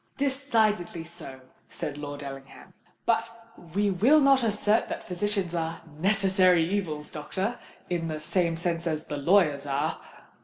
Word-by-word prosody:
"Decidedly 225 - +1
so," 165 -6 -11 0.3
said 150 -4 -5
Lord 145 -1 -6
Ellingham. 135 -1 -10 0.3
"But 230 0 +2 0.5
we 205 0 +2
will 240 +12 +5
not 275 -2 +5
assert 210 0 +2
that - - -4
physicians 185 0 -1
are 165 -1 -2 0.2
necessary 185 -3 +4
evils, 165 -6 -3
doctor—in 180 0 -4
the 155 -1 -3
same 165 +1 0
sense 170 0 -2
as 155 -1 -1
the 150 - -5
lawyers 150 -3 +3
are." 140 0 -1
175 Hz, 130 wpm, -27 LUFS, 155-205 Hz, 0.5 s, will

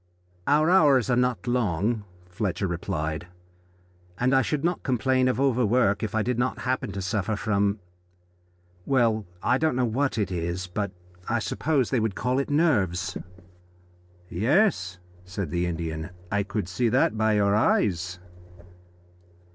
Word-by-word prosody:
"Our 155 +3 +4
hours 140 - +4
are - - +4
not 125 -1 0
long," 110 -2 0 0.2
Fletcher 90 0 -2
replied, 85 -2 -3 0.9
"and 125 +2 +2
I 135 - +5
should 145 +3 -2
not 175 +1 0
complain 130 0 +1
of 125 -1 0
overwork 125 -5 +2
if 110 0 -3
I 110 - +2
did 125 +1 -1
not 125 +1 -1
happen 125 -5 -1
to 100 0 -4
suffer 100 +3 -1
from 100 -1 0 1.1
well, 115 -6 +2 0.2
I 130 - +2
don't 160 -4 +1
know 125 0 +2
what 130 +3 0
it 100 -4 -1
is, 85 +1 -3
but 100 +2 -3 0.4
I 120 - +2
suppose 135 +2 0
they 130 - +2
would 110 -3 -1
call 125 +6 0
it 140 - -2
nerves." 100 - +1 1.1
"Yes," 110 - +1 0.3
said 90 -2 -5
the 90 0 0
Indian, 80 -1 -4 0.2
"I 105 0 +2
could 100 -1 -3
see 115 +6 0
that 120 -2 +2
by 110 0 +2
your 100 -1 +3
eyes." 90 -4 +1
110 Hz, 145 wpm, -26 LUFS, 95-130 Hz, 1.1 s, I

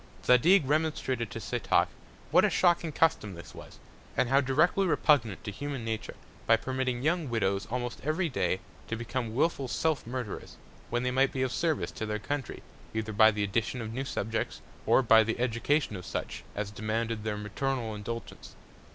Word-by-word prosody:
Zadig 155 +8 +6
remonstrated 145 -6 0
to - - -6
Setoc, - - +1 0.4
what - - +6
a - - +4
shocking 175 -2 +2
Custom 125 - +1
this 85 - -11
was, - - -12 0.4
and 125 - +2
how 135 +2 +5
directly 155 +9 +3
repugnant 130 - +2
to 105 - -4
human 135 +2 -5
Nature; 110 -1 -4 0.3
by 115 - +7
permitting 130 +1 -2
young 160 -1 +1
Widows, 100 -4 0
almost 120 0 -4
every 155 +5 0
Day, 95 - 0 0.3
to 115 - -2
become 120 0 -3
wilful 140 -1 +1
Self 155 0 0
Murderers; 120 -3 -5 0.3
when 120 +1 0
they 125 - 0
might 135 +1 +3
be 130 - -1
of 130 - -1
Service 160 +1 0
to 110 - -5
their 105 0 -1
Country, 140 +4 -4 0.3
either 110 0 -2
by 110 +1 +7
the 105 -1 -1
Addition 110 +5 -1
of 110 -1 -5
new 130 +3 -2
Subjects, 110 -4 -3 0.3
or 135 - +5
by 115 -1 +7
the 115 +2 -2
Education 125 +1 +1
of 90 - -7
such 90 - -4
as 100 0 -3
demanded 110 +1 -2
their 110 -1 -2
Maternal 115 +2 -2
Indulgence. 115 +3 -7
120 Hz, 175 wpm, -29 LUFS, 110-140 Hz, 0.4 s, by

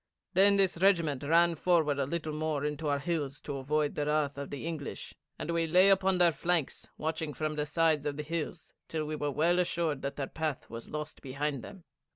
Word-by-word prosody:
Then 200 +1 +5
this 185 -4 +2
regiment 170 -8 +3
ran 170 +3 +4
forward 160 -3 +2
a 135 - 0
little 155 0 -3
more 155 -2 -1
into 150 +1 -2
our 145 -1 +2
hills 145 -3 -2
to 145 -2 -5
avoid 145 +2 0
the 145 0 -2
wrath 150 -2 +1
of 140 0 -6
the 140 - -6
English, 160 -4 -5 0.2
and 170 - -3
we 165 -1 +1
lay 180 +4 +6
upon 190 -1 +4
their 175 -1 +5
flanks 165 0 -1
watching 160 -1 -3
from 155 -1 -2
the 150 0 -2
sides 155 -2 +2
of 145 -1 -3
the 150 - -3
hills 165 +1 -5
till 155 -1 -2
we 155 +1 -3
were 145 -1 -1
well 165 +5 +2
assured 170 -5 0
that 140 - -3
their 140 - -2
path 155 -4 -4
was 115 0 -8
lost 150 0 -6
behind 140 0 -3
them. 190 - -11
155 Hz, 210 wpm, -31 LUFS, 145-170 Hz, 0.2 s, lay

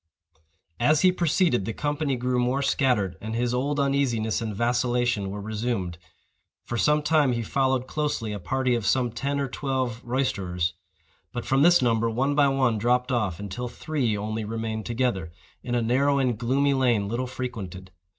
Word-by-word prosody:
As 150 +5 +3
he 185 - +6
proceeded, 170 - +1
the 115 - -3
company 145 -1 -1
grew 125 0 0
more 125 +3 +1
scattered, 125 -9 +1
and 110 +1 -4
his 120 +1 0
old 140 +4 0
uneasiness 130 -6 +1
and 110 -2 -3
vacillation 120 -2 +1
were 100 +2 -5
resumed. 105 -5 -3 0.6
For 120 - -5
some 150 +5 +2
time 150 -4 +3
he 115 -1 -2
followed 130 +2 +1
closely 140 -7 -2
a 100 - -4
party 130 +5 0
of 120 -2 0
some 120 +2 +2
ten 140 +5 -2
or 140 - 0
twelve 130 -3 -2
roisterers; 95 -9 -1 0.6
but 120 - -5
from 135 +1 +2
this 175 -2 +6
number 115 -1 +2
one 130 +5 0
by 145 -1 +4
one 130 -5 +1
dropped 125 +3 +1
off, 105 -9 0
until 100 +5 -5
three 125 -4 -2
only 110 +2 -3
remained 110 0 -4
together, 115 -9 -1 0.3
in 120 -1 -3
a 120 - +1
narrow 140 +5 +2
and 130 -3 +1
gloomy 135 +5 +1
lane 120 -6 +2
little 120 +4 -2
frequented. 105 -8 -6
125 Hz, 170 wpm, -26 LUFS, 110-135 Hz, 0.6 s, he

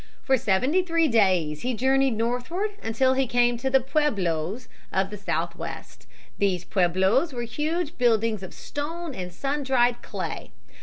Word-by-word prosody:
For 265 - +3
seventy 255 - +2
three 335 -2 +2
days 185 - +2
he 250 0 -1
journeyed 265 0 +2
northward 250 - -1
until 260 +4 +2
he 265 0 +1
came 240 0 +3
to 265 +3 -1
the 265 0 +5
pueblos 220 - -1
(pweb' - - -30 0.2
lo) - - +1
of 195 +1 -4
the 210 - -6
Southwest. 165 - -5 0.3
These 185 -3 +1
pueblos 190 - +2
were 240 -1 -3
huge 300 +7 -2
buildings 225 -3 +2
of 190 - -8
stone 320 +2 -5
and 180 -5 -6
sun 280 +9 -2
dried 245 -3 +2
clay. - - -5
240 Hz, 160 wpm, -25 LUFS, 195-270 Hz, 0.3 s, the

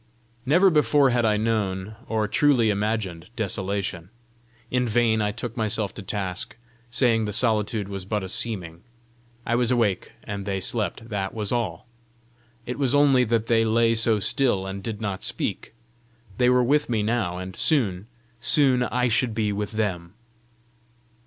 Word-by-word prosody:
Never 180 +7 +5
before 145 -3 +4
had 120 -1 +2
I 105 -1 +3
known, 105 -2 -1
or 110 -1 0
truly 120 -2 +3
imagined 100 -5 -2
desolation! 95 -4 -2 0.6
In 125 -1 +1
vain 110 -1 +2
I 105 0 0
took 115 +1 -6
myself 110 -3 -1
to - - -8
task, 95 -1 -4 0.3
saying 115 -2 +2
the 105 - -3
solitude 105 -2 +1
was 100 -1 -5
but 105 +1 -2
a - - -4
seeming: 90 -5 -3 0.6
I - - -1
was 120 0 +2
awake, 115 -7 0
and 100 -1 -6
they 95 -1 -1
slept 110 +3 -2
that 100 -2 -3
was 105 -2 -1
all! 110 -9 -2 0.8
it 125 +3 -5
was 135 -1 +2
only 140 -3 +5
that 115 -1 0
they 115 -1 +3
lay 115 +1 +3
so 115 -1 +2
still 105 -2 +1
and 95 0 -5
did 110 0 -5
not 100 -3 -3
speak! - - -3 0.7
they 125 0 +4
were 125 0 +4
with 145 +3 +2
me 110 -3 0
now, 105 -6 -1
and 95 0 -7
soon, 105 - +1 0.3
soon 130 +1 +3
I 125 0 +1
should 115 0 0
be 105 -2 0
with 105 +2 -4
them! 95 -4 -3
110 Hz, 160 wpm, -24 LUFS, 100-120 Hz, 0.8 s, Never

